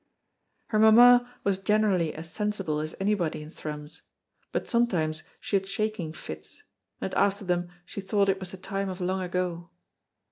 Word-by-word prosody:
Her 215 - +2
mamma 245 +3 +7
was 195 -1 +1
generally 195 -5 +2
as 160 +1 -7
sensible 205 -8 -1
as 155 +1 -4
anybody 195 -6 0
in 150 - -11
Thrums, 150 0 -7 0.5
but - - -2
sometimes 170 -10 +1 0.2
she - - -2
had 190 0 -4
shaking 215 -5 -2
fits, 75 - -9 0.4
and - - -4
after 200 0 +2
them 175 -1 0 0.2
she 200 - -6
thought 200 +1 +2
it 195 0 +2
was 190 -2 -4
the 190 - -8
time 195 +1 -3
of 185 0 -5
long 185 +1 -1
ago. 180 -1 -2
190 Hz, 165 wpm, -28 LUFS, 165-210 Hz, 0.5 s, mamma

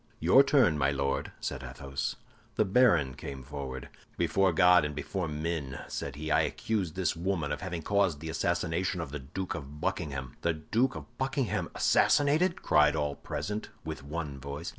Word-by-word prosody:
"Your 90 - +7
turn, 135 - +4
my 70 -1 +3
Lord," 70 -1 -1
said 70 -2 -4
Athos. 65 +1 -4 0.4
The 110 - +3
baron 95 - +4
came 70 -1 -7
forward. 65 -2 -6 0.3
"Before 95 -1 +3
God 90 +1 +6
and 75 -1 -3
before 90 +4 -3
men," 75 -3 -3
said - - -4
he, 80 +2 -4
"I - - +5
accuse 100 -8 -1
this 90 0 0
woman 85 -4 -1
of 75 - -3
having 90 -3 -4
caused 100 -6 +2
the 80 +1 -6
assassination 85 +2 0
of 80 -5 -4
the 75 - -4
Duke 90 +8 -5
of 70 +2 -8
Buckingham." 70 -8 -3
"The 85 - +1
Duke 115 +12 0
of - - -10
Buckingham 130 -2 -1
assassinated!" 155 +6 +3
cried 75 0 +4
all 75 -2 0
present, 105 +8 -4 0.2
with - - -5
one 75 -2 -5
voice. 70 +4 -6
80 Hz, 170 wpm, -30 LUFS, 70-95 Hz, 0.4 s, Your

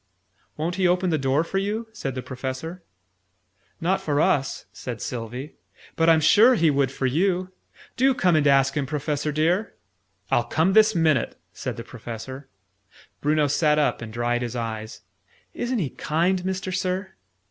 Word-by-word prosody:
"Won't 170 +4 -2
he 185 -1 +3
open 180 0 +2
the 155 - +1
door 135 +3 +2
for 195 +3 -2
you?" 215 +4 -2
said 135 - -4
the 130 - -4
Professor. 130 +7 -5 1.0
"Not 185 +4 0
for 145 -2 0
us," 140 -3 +1
said 120 -3 -6
Sylvie: 125 +6 -6 0.4
"but 165 0 +3
I'm 160 -1 +5
sure 225 - +6
he 165 -7 +3
would 140 -2 +1
for 135 - -3
you. 180 +7 +1 0.5
Do 265 +1 +4
come 180 -7 +3
and 150 -2 +3
ask 135 -1 +4
him, 140 -3 -1
Professor 150 +1 -2
dear!" 170 +8 0 0.6
"I'll - - +3
come 165 +4 +1
this 220 0 +5
minute!" 155 -7 +2 0.2
said - - -5
the - - -6
Professor. 130 +4 -8 0.7
Bruno 150 +1 +2
sat 150 +1 +2
up 150 -4 +1
and 115 -1 -7
dried 120 +1 -1
his 120 0 -4
eyes. 110 -2 -5 0.5
"Isn't 245 +1 -2
he 155 - -1
kind, 175 +4 0
Mister 190 0 -3
Sir?" 185 +1 -2
155 Hz, 165 wpm, -24 LUFS, 135-185 Hz, 1.0 s, sure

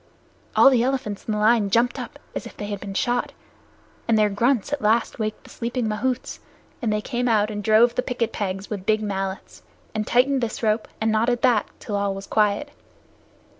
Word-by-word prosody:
All 270 - +7
the 250 -3 +3
elephants 250 -5 -2
in - - -2
the 210 - 0
lines 210 -1 +3
jumped 235 +3 +2
up - - -7 0.2
as - - -5
if - - -14
they 205 - -5
had 205 -1 -4
been 195 -1 -7
shot, 245 +4 0 0.7
and 225 -1 +3
their 210 -1 +3
grunts 240 +5 +1
at 290 - -1
last 225 +3 +1
waked 215 -1 -3
the - - -15
sleeping 235 0 -2
mahouts, 250 +4 -2 0.4
and 230 -4 0
they 210 0 0
came 245 +3 -2
out 215 -2 +2
and 205 -1 -4
drove 220 +3 +5
in - - -21
the - - +3
picket 245 -3 -2
pegs 195 -1 -3
with 200 -3 -6
big 215 0 +2
mallets, 195 -2 -4 0.3
and 215 -1 -2
tightened 260 +2 +3
this 235 0 -3
rope 215 0 +1
and 220 0 +1
knotted 235 +2 +1
that 240 -5 +3
till 205 - -4
all 200 -1 0
was 195 0 -7
quiet. 215 +9 +1
220 Hz, 205 wpm, -23 LUFS, 205-240 Hz, 0.7 s, All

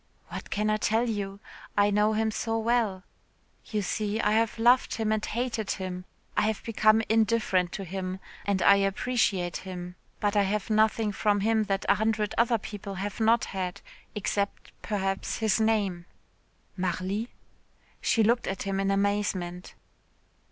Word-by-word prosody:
"What - - -7
can 210 +1 0
I 215 - +2
tell 225 +3 +1
you? 200 -3 -3 0.4
I 205 0 +4
know 210 +1 +3
him 220 0 +1
so 225 +1 -1
well. 225 -4 +1 0.6
You 210 -2 -2
see, 210 +3 -1
I 210 - +2
have 225 +1 +1
loved 245 +3 +4
him 220 -1 -1
and 215 -1 0
hated 230 -2 -2
him 185 -1 -4 0.3
I 215 - +2
have 220 -2 -2
become 220 -1 +3
indifferent 220 -5 +2
to 195 - -4
him 185 +1 -4 0.2
and 200 -2 0
I 200 - +7
appreciate 195 -2 0
him. 180 -1 -7 0.2
But 205 0 0
I 205 - +5
have 200 +2 -1
had 215 - +2
nothing 215 0 +3
from 205 0 +1
him 220 +1 +2
that 195 0 -1
a - - +6
hundred 215 -1 0
other 235 0 +3
people 205 -2 -7
have 200 +3 -4
not 225 +1 +3
had 185 -2 -4 0.3
except, 200 0 -2
perhaps, 195 -2 -2
his 220 -1 +1
name." 200 -6 +1 0.7
"Marly?" 185 +5 -2 0.7
She 225 - +3
looked 235 +3 +2
at 195 - -3
him 195 -1 -2
in 195 0 +1
amazement. 195 -3 -1
210 Hz, 160 wpm, -28 LUFS, 195-220 Hz, 0.7 s, I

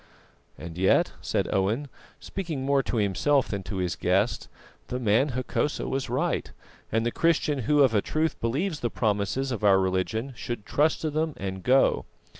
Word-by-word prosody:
"And 85 +1 -8
yet," 95 - +3
said - - -1
Owen, 105 +9 0 0.3
speaking 160 -9 -4
more 140 0 +3
to 125 - -3
himself 120 +7 +2
than 100 -2 -3
to 100 - -5
his 90 -2 -1
guest, - - 0 0.4
"the 125 - -3
man 125 +4 +2
Hokosa 130 +3 -1
was 135 0 -2
right, - - -1 0.4
and 115 +1 +1
the 120 - +1
Christian 155 -2 +1
who 145 +5 +3
of 130 -4 +3
a 105 - +3
truth 155 +6 -1
believes 150 +8 -1
the 120 - -1
promises 110 +5 -1
of 115 -3 -4
our 100 -2 +6
religion 95 +7 -1
should 120 -3 -5
trust 155 +2 +1
to 155 - -1
them 155 0 -1
and 95 -1 -4
go." 130 +6 +3
125 Hz, 175 wpm, -26 LUFS, 100-145 Hz, 0.4 s, our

